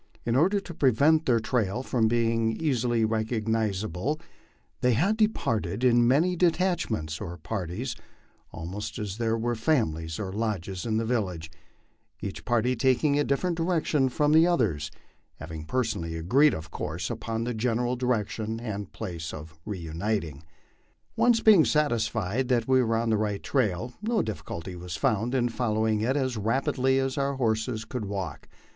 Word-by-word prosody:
In 120 - +1
order 185 +9 +3
to 185 -3 -9
prevent 150 +4 +3
their 120 -3 +4
trail 110 0 -1
from 115 -4 +1
being 115 -1 +1
easily 120 -7 +1
recogniz 110 -2 0
able, 115 - -2 0.6
they 125 -1 +3
had 180 - +2
departed 210 - 0
in 120 -1 +5
as 120 - +4
many 160 +8 +3
detachments 165 - 0
or 85 +1 -5
parties 100 - -4 0.6
almost 90 +6 -6
as 105 -1 -5
there 115 -1 +1
were 120 +1 -1
families 80 - 0
or 95 -3 -4
lodges 100 -2 -3
in 110 -1 +1
the 115 - 0
village, 90 -9 -2 0.7
each 100 - -6
party 120 +1 +2
taking 135 +4 +2
a - - +3
different 170 +6 0
direction 165 -5 +1
from 145 +4 +1
the 160 +2 +6
others, 95 - +1 0.5
having 80 -1 -8
personally 95 -7 -2
agreed, 130 - +4
of 80 0 -8
course, 80 +5 -4
upon 115 0 -3
the 120 +1 -2
general 120 +2 0
direction 115 -2 -1
and 105 -4 -5
place 85 -7 -5
of 80 +1 -10
reuniting. 85 -4 -3 0.7
Once 235 -2 +4
being 205 -7 +7
satisfied 115 - 0
that 120 -3 +1
we 130 -1 +4
were 115 -2 +1
on 115 0 0
the 110 - +3
right 105 -2 -2
trail, 120 -2 0
no 225 +1 +1
difficulty 95 -4 -6
was 90 -2 -6
found 115 +8 +1
in 120 -2 +2
following 110 -3 0
it 130 +6 +1
as 130 -4 -1
rapidly 130 +4 +1
as 135 +1 0
our 140 0 0
horses 110 -2 -1
could 110 0 -4
walk. 100 -2 -5
115 Hz, 160 wpm, -27 LUFS, 100-130 Hz, 0.7 s, being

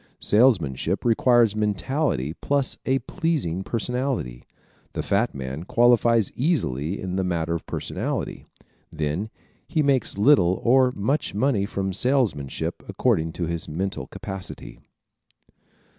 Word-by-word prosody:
Salesmanship 95 - +2
requires 120 -2 +4
mentality 105 - -1
plus 140 -2 +1
a 135 0 +3
pleasing 155 - -1
personality. 120 - -2 0.5
The - - -3
fat 100 +1 0
man 65 +3 -5
qualifies 115 0 +3
easily 100 - -1
in 95 -1 -3
the 95 - +1
matter 85 -2 -1
of 85 - -5
personality. - - -3 0.5
Then 80 +8 -2 0.4
he 155 - +1
makes 135 -8 +1
little 100 -6 +4
or 130 +1 +4
much 125 +4 -1
money 105 -4 +1
from 95 -2 -3
salesmanship, 110 - 0
according 80 0 0
to 85 - -4
his 85 -1 -3
mental 95 +5 -3
capacity. 95 -10 -7
100 Hz, 115 wpm, -24 LUFS, 85-125 Hz, 0.5 s, requires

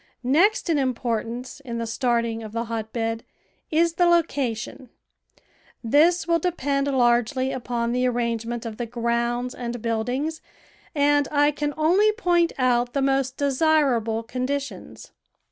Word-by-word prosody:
Next 360 - +3
in 320 -4 +2
importance 245 -1 -3
in 245 -4 -6
the 230 - -2
starting 235 -1 -1
of 215 -1 -9
the 230 0 -1
hot 225 -1 -5
bed 225 -1 -2 0.5
is 330 +1 +2
the 350 +1 +3
location; 265 -8 0 0.9
this 320 +8 +3
will 335 0 +3
depend 285 -5 -1
largely 255 0 +2
upon 235 -2 -2
the 250 +1 +1
arrangement 235 -1 -2
of 220 -2 -6
the 240 - -4
grounds 235 +1 -1
and 240 -1 -5
buildings, 245 +8 -2 0.5
and 290 -1 +3
I 290 0 +3
can 295 0 -3
only 365 +8 +4
point 350 -6 +2
out 245 -1 +1
the 275 - 0
most 270 -1 0
desirable 270 -6 +1
condi 255 +4 -2
tions. 280 - -10
255 Hz, 140 wpm, -24 LUFS, 235-290 Hz, 0.9 s, only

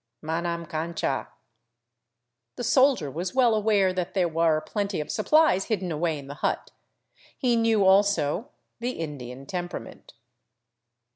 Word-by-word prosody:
" - - -43
Manam 170 +1 -2
cancha." 160 -3 -2 1.3
The 245 - -5
soldier 260 - +3
was 175 - -4
well 245 -3 +4
aware 205 -3 +2
that 180 0 -3
there 185 -2 +3
were 165 -1 +2
plenty 200 +2 -3
of 150 - -4
supplies 260 -4 +3
hid 220 -5 -1
den 180 -2 -3
away 160 0 -1
in 140 - -9
the 140 - -7
hut. - - -1 0.7
He 245 -2 +2
knew, 225 -3 +3
also, 190 - +3 0.3
the 245 +2 -2
Indian 135 -5 -7
temperament. 175 -9 -7
180 Hz, 140 wpm, -26 LUFS, 160-215 Hz, 1.3 s, well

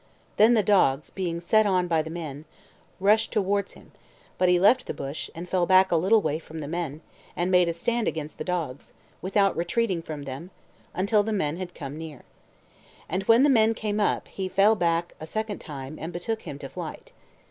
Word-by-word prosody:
Then 225 +3 +6
the 215 - +3
dogs, 160 -8 +2
being 175 -3 -3
set 215 +4 +3
on 185 -2 +2
by 165 -2 +2
the 155 - -7
men, 155 -3 -6 0.5
rushed 210 +3 +3
towards 200 -1 0
him; - - -17 0.5
but 185 - +4
he 180 0 +4
left 245 +7 +4
the - - -4
bush, 140 +3 -5
and 170 +2 -7
fell 180 -1 +1
back 190 0 +5
a - - +3
little 195 +7 +3
way 155 - -1
from 160 0 -9
the 145 - -5
men, 160 -2 -4 0.3
and 175 +2 -1
made 180 -2 +4
a - - -1
stand 235 +6 -1
against 155 -1 -4
the - - -2
dogs, 160 -7 -4 0.3
without 195 +1 +2
retreating 180 +1 0
from 155 -3 -7
them, 140 +6 -7 0.5
until 205 +3 +3
the 220 +2 -3
men 165 -7 -1
had 180 -1 -7
come 145 0 -7
near. 155 -5 -9 0.8
And 185 +3 -1
when 230 +3 +6
the - - +6
men 225 -4 +4
came 210 -1 -2
up, 205 - 0
he 190 -1 -5
fell 195 +4 +4
back 170 -3 0
a 155 - -7
second 215 +3 -3
time, 140 -1 -8
and 165 - -4
betook 220 +6 -3
him - - -6
to - - -8
flight. - - -8
180 Hz, 205 wpm, -26 LUFS, 160-205 Hz, 0.8 s, Then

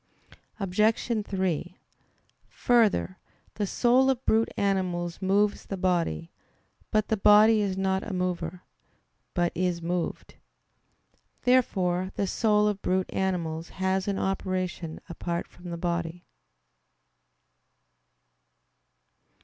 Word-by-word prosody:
Obj. 215 +3 +1
3: 185 -2 -2 0.7
Further, 220 -6 +2 0.3
the 205 -2 -2
soul 255 +5 +3
of 260 -1 -1
brute 225 +1 +3
animals 180 -3 -1
moves 200 +2 +1
the 195 - -4
body. 170 - 0 0.6
But 215 0 +1
the 220 - +1
body 210 +2 +6
is 195 -2 -1
not 190 0 0
a 225 - -6
mover, 180 -1 -3 0.7
but 175 -1 +1
is 180 -1 -1
moved. 170 0 -3 1.1
Therefore 185 -8 +2
the 200 - 0
soul 210 +1 +2
of 205 -2 -1
brute 185 0 -1
animals 170 -4 -2
has 190 0 0
an 200 -1 0
operation 185 -4 -2
apart 170 0 -4
from 175 0 -12
the 170 - -4
body. 170 0 -3
190 Hz, 105 wpm, -27 LUFS, 175-210 Hz, 1.1 s, body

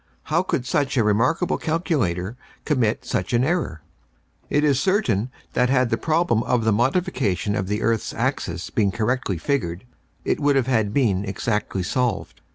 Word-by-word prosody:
How 170 - +4
could 145 -9 -2
such 140 +1 0
a 120 - +4
remarkable 115 - +1
calculator 125 - -1 0.3
commit 125 -8 +1
such 95 +5 -2
an 120 +1 +3
error? 135 - -1 0.7
"It 145 - +2
is 140 -3 +3
certain 130 - +1 0.2
that 125 0 +2
had 130 -2 +2
the - - +4
problem 160 -8 +1
of 120 -1 +1
the 110 - +3
modification 120 - 0
of 95 -3 -2
the 105 +2 -1
earth's 115 0 0
axis 90 -9 -2
been 105 -3 +2
correctly 110 -2 -1
figured, 85 - -2 0.4
it - - 0
would 145 -1 +3
have 135 -3 +2
had 110 -6 +1
been 105 -7 +1
exactly 100 -1 -2
solved. 120 +2 -2
120 Hz, 165 wpm, -23 LUFS, 105-140 Hz, 0.7 s, How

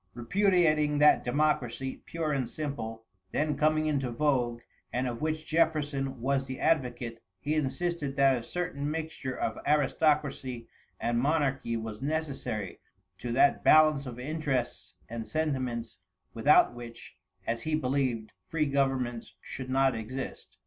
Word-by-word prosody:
Repudiating 155 - +3
that 150 +1 +6
democracy, 135 -1 0
pure 165 -2 -2
and 135 -4 -1
simple, 115 -7 -5 0.3
then 150 0 0
coming 155 +2 +2
into 140 -4 0
vogue, 120 -2 0 0.3
and 125 +1 0
of 120 -1 -4
which 155 0 -1
Jefferson 145 -5 0
was 135 +2 0
the 130 0 -5
advocate; 125 -6 0 0.2
he 145 +9 -1
insisted 155 0 -1
that 135 -1 +5
a 120 - -3
certain 145 0 -3
mixture 155 -4 -4
of 110 - -2
aristocracy 145 -4 +1 0.3
and 120 0 0
monarchy 135 -4 +1
was 110 -1 -6
necessary 140 - -3 0.4
to 120 - -4
that 140 +3 +4
balance 155 -3 +6
of 120 -2 -7
interests 135 -3 -2
and 115 -1 -5
sentiments 130 -8 -2 0.3
without 130 +5 +5
which, 120 -1 -10 0.3
as 115 0 -1
he 155 +4 0
believed, 130 -6 -1 0.2
free 160 -2 0
governments 135 -4 -1
should 130 -1 -7
not 135 0 +3
exist. 120 +4 -6
135 Hz, 135 wpm, -29 LUFS, 120-155 Hz, 0.4 s, that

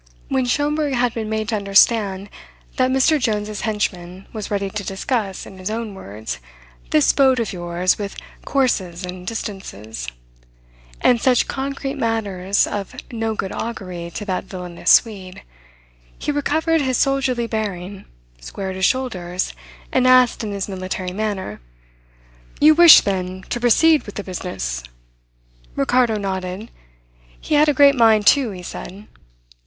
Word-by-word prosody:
When 265 -1 +1
Schomberg 290 +2 0
had 245 -1 +1
been 220 -2 -4
made 220 0 -2
to 225 - 0
understand 200 -1 +2 0.5
that 255 0 +3
Mr. 265 +4 +3
Jones's 210 -3 -2
henchman 190 -4 -3
was 215 -3 -5
ready 200 -1 -1
to 210 0 -4
discuss, 195 +1 -3
in 190 - -12
his 185 +2 -4
own 220 -1 -4
words, 110 - -7 0.5
"this 150 - +4
boat 265 -2 +4
of 225 -3 -2
yours, 175 +1 0
with 200 -1 -5 0.3
courses 190 -10 0
and 180 0 -8
distances," 115 - -6 0.9
and 240 -2 +3
such 255 -2 +3
concrete 275 +1 -4
matters 200 -5 0
of 205 +3 -5 0.2
no 225 -1 -2
good 195 - -3
augury 185 -7 -5
to 210 - -4
that 185 -2 -2
villainous 180 -2 -4
Swede, 195 -5 +2 0.7
he - - -2
recovered 315 +3 +1
his 260 -3 0
soldierly 270 -3 +1
bearing, 200 -4 -4 0.3
squared 190 - -6
his 190 - +2
shoulders, 185 -9 -1 0.4
and 255 -1 +3
asked 255 -2 +5
in 210 - -3
his 200 -1 -3
military 185 -1 -4
manner: 205 - -3 1.0
"You 305 +1 +7
wish, 340 0 +9
then, 185 -1 -3
to 240 - -1
proceed 295 +6 +4
with 205 - -9
the 205 - -4
business?" 175 - -4 0.9
Ricardo 235 - +2
nodded. 190 +1 -4 0.7
He - - -4
had 300 +1 +5
a - - +3
great 280 +1 +7
mind 225 -4 +4
to, 275 -5 -1
he 185 -3 -8
said. 195 +4 -8
210 Hz, 145 wpm, -20 LUFS, 185-250 Hz, 1.0 s, wish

